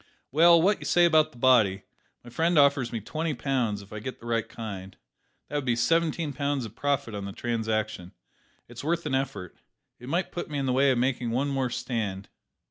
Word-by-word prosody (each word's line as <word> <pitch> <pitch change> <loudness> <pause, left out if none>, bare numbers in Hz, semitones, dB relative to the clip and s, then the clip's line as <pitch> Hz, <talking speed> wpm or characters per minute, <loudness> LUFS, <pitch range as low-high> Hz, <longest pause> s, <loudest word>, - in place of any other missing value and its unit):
Well, 170 +4 +6
what 195 +5 +2
say 175 - +3
you 175 - +7
about 155 -2 +3
the - - -17
body? 115 -7 +4 0.4
My 120 - -12
friend 165 +6 +1
offers 140 -4 +4
me 115 -2 -4
twenty 155 +7 -3
pounds, 120 -6 -1
if 100 - -14
I 105 - -5
get 130 +4 -7
the - - -14
right 115 -1 -1
kind. 95 -4 -7 0.5
That 145 - -3
would 145 - -3
be 120 -2 +2
seventeen 160 +3 +1
pounds 140 -1 -1
of 110 0 -10
profit 140 -5 -1
on 100 -1 -5
the 100 - -5
transaction. 110 -6 -2 0.5
It's 120 +1 -10
worth 170 +2 -1
an 145 - -2
effort. 130 -9 -3 0.4
It 125 - -9
might 175 +5 -1
put 175 - -5
me 150 - -3
in 135 - -1
the 130 - +1
way 135 +2 +4
of 130 - +2
making 125 -1 0
one 130 +5 0
more 135 -2 -1
stand." 115 -6 -3
130 Hz, 210 wpm, -27 LUFS, 115-145 Hz, 0.5 s, you